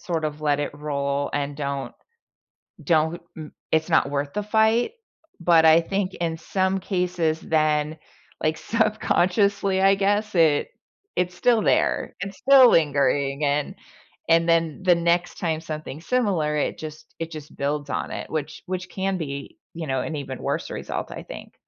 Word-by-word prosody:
sort 170 -5 -2
of 150 0 -4
let 145 -1 +2
it 145 - -3
roll 140 -1 -2
and 145 0 -2
don't 140 -2 -4 0.9
don't, 160 0 +1 0.2
n 155 -2 -8 0.2
it's 160 +1 +2
not 160 -4 +3
worth 140 0 -2
the 210 - -1
fight, 220 - +2 0.5
but 170 -2 +5
I 160 +1 +7
think 195 +2 -2
in 165 -1 -2
some 190 +2 0
cases 180 -4 -1
then, 155 -1 +1 0.4
like, 155 0 0
subconsciously, 200 -3 +1
I 195 +1 +5
guess 205 +2 0
it 160 -4 +3 0.5
it's 180 0 0
still 230 +3 +3
there, - - +1
it's 195 0 -6
still 265 -2 +7
lingering 140 -2 +2
and 145 0 0 0.5
and 165 0 +4
then 165 -1 +1
the 180 -1 +6
next 170 +1 0
time 160 -2 -1
something 155 -2 -6
similar, 180 -9 0
it 150 - -1
just 155 -1 -9
it 165 0 -4
just 155 -2 -9
builds 145 0 -2
on - - -2
it, - - -6
which 155 -1 -4
which 185 -1 -4
can 190 0 -2
be, 140 -4 -6 0.2
you 165 -1 -5
know, 130 -1 0
an 160 - -4
even 135 -2 -6
worse - - -2
result, - - -5
I - - -7
think. - - -10
160 Hz, 165 wpm, -24 LUFS, 150-190 Hz, 0.9 s, I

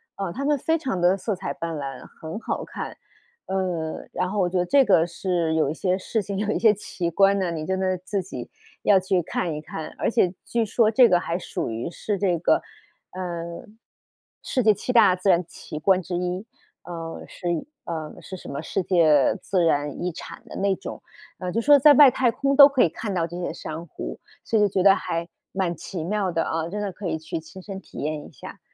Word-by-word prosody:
呃， 195 -3 -4
它 275 - -4
们 295 0 +3
非 325 +5 0
常 260 - -2
地 175 +2 +4
色 200 +2 -2
彩 - - -4
斑 165 -1 -4
斓， 135 -3 -6 0.2
很 160 +6 -6
好 225 - -3
看。 - - -7 0.5
呃， 180 -4 -2
然 185 - -1
后 205 +2 -2
我 185 - +3
觉 180 +1 0
得 175 - +1
这 275 +3 +5
个 175 -5 +4
是 170 -2 -1
有 155 -3 +2
一 - - -3
些 185 +3 0
事 215 +3 -2
情， 200 -1 -5
有 210 +1 0
一 - - 0
些 220 -2 +6
奇 185 -4 -3
观 195 +3 +4
呢， 185 -2 0
你 160 -2 -4
真 190 +2 -1
的 185 -1 0
自 185 +2 -3
己 130 -9 -7 0.4
要 200 -2 +5
去 185 -1 0
看 165 0 -2
一 - - -4
看， 155 0 -6
而 - - 0
且 205 -7 +3
据 235 -1 0
说 220 +1 +2
这 240 +1 +6
个 175 - +4
还 170 +1 -2
属 145 - -4
于 115 +7 -3
是 200 +3 -3
这 180 -3 +2
个， 165 - +2 0.5
呃， 170 -2 -5 0.8
世 260 - 0
界 220 -2 +6
七 250 - -3
大 210 -6 +6
自 185 +1 +2
然 175 +1 +3
奇 155 -2 -8
观 185 +4 +3
之 180 -1 -5
一， 180 +3 -2 0.4
呃， 165 -2 -7
是 175 - -7 0.4
呃， 160 -2 -5
是 190 - -8
什 - - -10
么 140 - -4
世 185 +4 -2
界 160 -6 +4
自 185 -3 +1
然 145 0 0
遗 180 - -1
产 170 - -10
的 - - -10
那 195 0 +1
种。 190 - -8 0.4
呃， 180 -1 -3
就 225 - 0
说 285 +4 +6
在 290 +2 +8
外 280 -1 +9
太 250 0 +2
空 275 +4 0
都 280 0 +10
可 275 -3 +3
以 - - +3
看 205 +6 -5
到 170 -2 +1
这 170 +1 -8
些 175 - -2
珊 160 +2 -7
瑚， - - -7 0.2
所 225 - +1
以 205 -1 +4
觉 190 -1 +1
得 195 0 +7
还 170 -2 -3 0.3
蛮 185 -3 -1
奇 170 0 -6
妙 195 +1 -1
的 165 -1 0
啊， 165 0 -2
真 210 +3 -3
的 200 - -2
可 185 +1 -6
以 165 - -1
去 160 +1 -5
亲 160 +4 -12
身 195 -1 -7
体 - - -15
验 150 0 -3
一 - - -16
下。 140 - -11
185 Hz, 245 characters per minute, -24 LUFS, 165-205 Hz, 0.8 s, 都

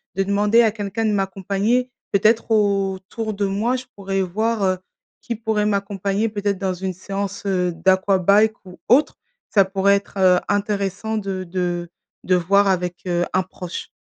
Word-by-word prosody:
de 195 - +1
demander 205 +3 +3
à 220 - +3
quelqu'un 210 +1 -3
de 215 - +2
m'accompagner. 200 +5 0 0.2
Peut-être 220 +3 +2
autour 200 +1 0
de 200 0 -1
moi, 215 +6 0
je 255 - -8
pourrais 195 -1 -2
voir, 215 +4 -1
heu, 185 -1 +2 0.4
qui 235 - -4
pourrait 220 -1 -1
m'accompagner 200 +1 -1
peut-être 205 -2 -2
dans 190 -1 -1
une 190 +1 -3
séance, 195 +2 -5
heu, 180 -2 +1
d'aquabike 190 +4 +3
ou 180 -1 -13
autre, 270 +6 +4 0.3
ça 200 - +5
pourrait 195 +1 +2
être, 200 +1 -5
heu, 185 -1 +5
intéressant 205 +1 -1
de 195 -3 -3
de 175 -1 -2 0.4
de 185 - +3
voir 200 +3 +3
avec, 180 -2 -1
heu, 175 0 +1
un 185 - +3
proche. 180 -1 -7
200 Hz, 165 wpm, -21 LUFS, 190-210 Hz, 0.4 s, ça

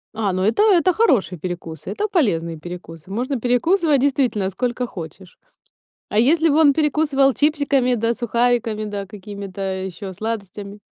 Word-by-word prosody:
А, 210 -3 0
ну 185 +1 -1
это, 225 - +2
это 370 -4 +4
хороший 255 - +2
перекус, 175 -2 -6
это 425 +1 -2
полезный 170 - 0
перекус, 175 -1 -9
можно 245 +6 -2
перекусывать, 290 +5 +2
действительно, 255 -8 +1
сколько 245 +3 -2
хочешь. 180 -2 -10 0.7
А 210 - +2
если 320 +6 +3
бы 290 - +2
он 290 -3 +6
перекусывал 290 -2 +2
чипсиками 285 -4 +2
да 230 +1 0
сухариками, 235 -2 0
да 205 -1 -5
какими-то 200 -1 -9 0.2
ещё 190 +1 -7
сладостями? 205 -1 -6
230 Hz, 145 wpm, -21 LUFS, 195-280 Hz, 0.7 s, он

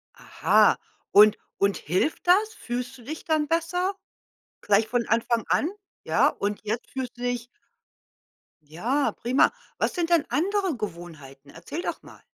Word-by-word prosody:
Aha, - - +3 0.3
und 210 +1 +7 0.2
und 200 0 +2
hilft 185 - -1
das? 425 +5 +4
Fühlst 245 +1 -5
du 240 - -15
dich 310 +6 -7
dann 310 -2 +1
besser 345 +4 0 0.7
gleich 210 +1 +3
von 240 -1 0
Anfang 230 0 +1
an? 320 - +2 0.3
Ja, - - +3
und 205 0 -3
jetzt 220 +3 -4
fühlst 255 -2 -5
du 245 - -10
dich 245 -1 -2 1.2
Ja, 225 - -1
prima. 250 +3 +4 0.3
Was - - 0
sind 345 -2 -1
denn 335 -4 +3
andere 385 0 0
Gewohnheiten? 165 -9 -8
Erzähl 175 - -6
doch - - -4
mal. - - -15
245 Hz, 145 wpm, -25 LUFS, 205-320 Hz, 1.2 s, und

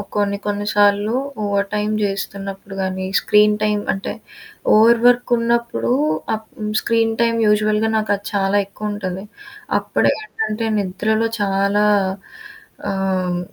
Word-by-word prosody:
కొన్ని 200 -1 0
కొన్ని 205 0 -2
సార్లు 205 +1 +3 0.3
ఓవర్ 200 0 0
టైమ్ 210 +1 0
చేస్తున్నప్పుడు 195 0 -4
గానీ 190 0 -2 0.2
స్క్రీన్ 210 0 +4
టైమ్ 210 -1 +1
అంటే 195 - -5 0.6
ఓవర్ 225 +2 +6
వర్క్ 245 0 +4
ఉన్నప్పుడు 235 +1 0 0.4
ఆహ్, 220 0 -4 0.4
స్క్రీన్ 225 -1 +1
టైమ్ 230 0 +2
యూజువల్‌గా 210 +1 +2
నాకు 215 -1 -1
అది 200 0 -11
చాలా 200 0 +1
ఎక్కువ 210 +1 -5
ఉంటది. 190 -2 -5 0.6
అప్పుడే - - +1
ఏంటంటే 230 - -3
నిద్రలో 215 +4 0
చాలా 200 +1 +2 1.0
ఆహ్, 195 -1 -2 0.3
హ్మ్. 175 0 -1
205 Hz, 125 wpm, -19 LUFS, 200-220 Hz, 1.0 s, ఓవర్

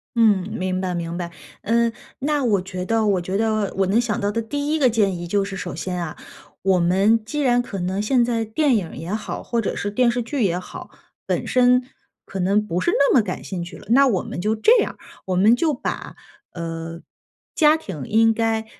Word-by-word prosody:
嗯， 220 -5 +4
明 185 -4 -2
白 180 -1 -2
明 170 0 -4
白。 170 -1 -4 0.3
嗯， 235 +2 +2 0.3
那 290 0 0
我 205 -6 +2
觉 185 -1 -5
得 225 +3 +1
我 195 -3 +2
觉 185 +3 -2
得 215 -2 0
我 195 - +3
能 220 +5 +3
想 225 -4 -2
到 205 0 0
的 230 - -1
第 285 +6 -3
一 315 - +1
个 260 - +5
建 210 -5 +1
议 175 - -6
就 200 +2 +1
是 195 -1 -6
首 145 - -5
先 180 +2 -3
啊， 155 -3 -6 0.5
我 190 -1 +3
们 195 +6 +3
既 295 +7 -4
然 245 -3 +3
可 200 -5 -6
能 185 +3 -1
现 240 +3 +2
在 230 -2 0
电 260 +5 +1
影 185 -7 -3
也 170 +5 -5
好， 215 - -4
或 235 -1 -1
者 - - -2
是 205 - -3
电 245 +3 +3
视 245 - -1
剧 270 -1 -2
也 175 -3 +1
好， 185 - -9 0.4
本 - - -1
身 250 0 +4 0.4
可 195 - -6
能 200 +4 +2
不 175 -3 -2
是 - - +2
那 280 - +3
么 250 - +6
感 185 -4 -5
兴 180 -3 -4
趣 175 - -9
了。 - - -14
那 275 +4 +6
我 200 -8 +1
们 - - -5
就 215 +3 +1
这 455 - +5
样， - - -2 0.3
我 185 -1 -1
们 210 +6 +5
就 310 +2 +1
把， - - -5 0.4
呃， 165 0 -6 0.5
家 310 -1 +5
庭 155 - -7
应 225 +1 +4
该 225 0 0
210 Hz, 240 characters per minute, -22 LUFS, 185-240 Hz, 0.5 s, 么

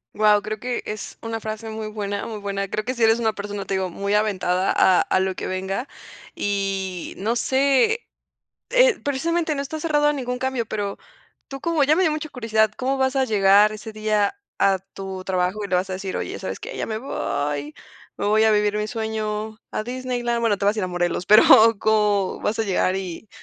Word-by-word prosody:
Guau, 210 -1 +4
creo 215 0 -5
que 250 +2 -3
es 210 0 -6
una 225 0 -4
frase 220 +1 -6
muy 220 0 -5
buena 205 -1 -4
muy 220 -2 -6
buena. 200 -1 -3
Creo 215 - -3
que 255 +4 -3
sí 235 - 0
eres 225 +1 +4
una 220 -2 +1
persona, 205 -1 -5
te 195 - -2
digo, 190 -1 -1
muy 200 +3 -1
aventada 190 -3 +1
a 185 -1 +5
a - - +1
lo 190 0 -1
que - - -5
venga 190 +7 -3 0.5
y 195 -3 -2
no 225 +5 -1
sé, 275 - +2 0.6
eh, - - +4
precisamente 320 +3 0
no 280 - -2
estás 310 +2 -6
cerrado 295 -2 +2
a 295 - +3
ningún 250 -3 -3
cambio, 260 -3 -2
pero 205 -2 -3 0.5
tú 275 -1 -8
como 330 -4 +2
ya 295 +3 +4
me 370 - +2
dio 325 - +3
mucha 305 0 -3
curiosidad, 220 -4 +1
¿cómo 265 +1 -1
vas 265 0 +1
a 265 -1 +2
llegar 205 -1 +5
ese 215 +1 -8
día 215 - 0 0.2
a 195 -2 +3
tu 190 -1 -8
trabajo?, 185 +2 -1
y 200 - -5
le 185 - +2
vas 185 +2 -1
a - - -2
decir: 190 0 -4
"Oye, - - -4
¿sabes - - -5
qué?, - - -8
ya - - -3
me 220 -1 -3
voy, 145 - -3 0.4
me 200 - -2
voy 215 +1 +4
a 220 - +5
vivir 210 -1 +2
mi 210 0 -2
sueño 220 -1 -3
a 215 - -3
Disneyland", 245 -1 -2
bueno, 225 -4 +1
te - - -2
vas 205 +2 +3
a 215 - 0
ir - - -1
a - - -3
Morelos, 175 0 -1
pero, 210 +1 +8 0.3
¿cómo 210 -3 +1
vas 215 - -1
a 225 - +1
llegar 190 -1 +1
y: 190 +2 -6
215 Hz, 220 wpm, -23 LUFS, 195-245 Hz, 0.6 s, pero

